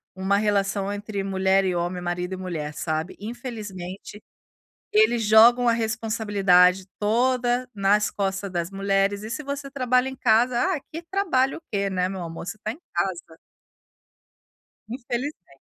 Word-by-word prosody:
uma 190 +1 +1
relação 200 -1 0
entre 205 -1 -4
mulher 190 0 +2
e 185 - 0
homem, 175 +1 -2
marido 180 +1 -3
e - - -9
mulher, 160 -5 -5
sabe. 160 +2 -3
Infelizmente 210 -4 -7 0.7
eles 415 - +3
jogam 235 +3 +6
a - - +5
responsabilidade 205 -5 +2
toda 245 +3 +1
nas 205 +1 +2
costas 195 0 -2
das 175 0 -3
mulheres 195 +1 0
e 215 - -6
se 300 - -4
você 280 0 -5
trabalha 255 -1 +1
em 265 - -7
casa: 240 +1 +3 0.2
"Ah, 295 - -3
que 330 +2 -6
trabalho 330 -8 0
o - - -19
que, 200 -2 -1
né, 185 -1 0
meu 190 -1 -5
amor, 165 0 -7
você 215 - -5
tá 215 - -1
em 305 - -15
casa". 175 -2 -3 1.5
Infelizmen 245 - -5
205 Hz, 150 wpm, -24 LUFS, 190-240 Hz, 1.5 s, jogam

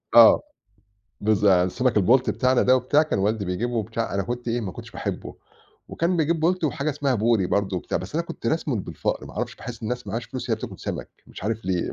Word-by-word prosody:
آه، - - +9 0.8
بالظ 105 -1 +2
يعني 95 -3 +6
السمك 115 +5 0
البلطي 120 +6 +4
بتاعنا 130 0 +2
ده 130 +1 +5
وبتاع 130 +4 +3
كان 155 - -1
والدي 105 +1 0
بيجيبه 105 +7 -2
وبتاع 115 -1 -2
أنا 100 - +1
كنت 120 +3 -4
إيه، 120 +1 0
ما 95 -5 -4
كنتش - - -10
باحبه، - - -5 0.5
وكان 175 +2 0
بيجيب 160 0 +1
بلطي 170 0 +2
وحاجة 145 +1 -1
اسمها 140 -2 0
بوري 110 -3 +2
برضه 95 -1 0
وبتاع، 85 - -2
بس - - -8
أنا 170 +1 0
كنت 115 - -7
راسمه 150 -3 0
بالفقر، 95 - -3
ما - - -11
أعرفش، - - -4
باحس 120 -1 -8
الناس 125 +2 -2
اللي 100 - -8
معاهاش 115 +3 -3
فلوس 125 0 -6
هي 115 - +4
اللي - - -10
بتاكل - - -12
سمك، - - -4 0.2
مش - - -11
عارف 110 0 -2
ليه 90 -2 -1
120 Hz, 225 wpm, -24 LUFS, 105-130 Hz, 0.8 s, آه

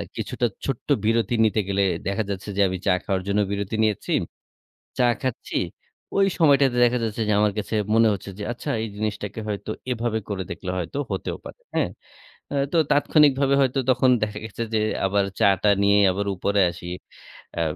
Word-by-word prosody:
কিছুটা 120 - -2 0.2
ছোট্ট 135 -4 -3 0.2
বিরতি 115 +1 +2
নিতে 110 0 +1
গেলে 100 0 +1 0.2
দেখা 100 +3 0
যাচ্ছে 100 +1 -5
যে, - - +3
আমি 95 0 -3
চা 95 - +4
খাওয়ার 95 -2 -1
জন্য 100 +1 +1
বিরতি 100 +1 -2
নিয়েছি। 105 -3 -1 0.9
চা 125 - +4 0.2
খাচ্ছি, 130 -3 -3 0.6
ওই 195 - +5
সময়টাতে 140 -5 +4
দেখা 120 +1 +2
যাচ্ছে 110 0 -2
যে, - - +3
আমার 105 -1 +3
কাছে 105 +1 -3 0.2
মনে 115 0 +5
হচ্ছে 100 0 -7
যে, - - -5
আচ্ছা 120 +5 -6
এই 115 - -3
জিনিসটাকে 105 0 -3
হয়তো 105 0 -4 0.2
এভাবে 115 -2 -1
করে 100 -3 -2
দেখলে 90 +2 -5
হয়তো 90 - -4
হতেও - - -3
পারে। - - -10
হ্যাঁ। - - +1 0.6
অ্যা 140 - -1
তো - - +1
তাৎক্ষণিকভাবে 145 -2 +4
হয়তো 135 0 +2
তখন 130 0 +4
দেখা 105 -1 -2
গেছে 110 +1 -5
যে, 110 - +3 0.3
আবার 100 +1 +2 0.2
চা - - +6
টা 105 - +4
নিয়ে 100 0 +4
আবার 100 +2 -2
উপরে 100 +2 +1
আসি। 85 0 -10 0.7
অ্যা 85 - -1
110 Hz, 180 wpm, -24 LUFS, 100-125 Hz, 0.9 s, চা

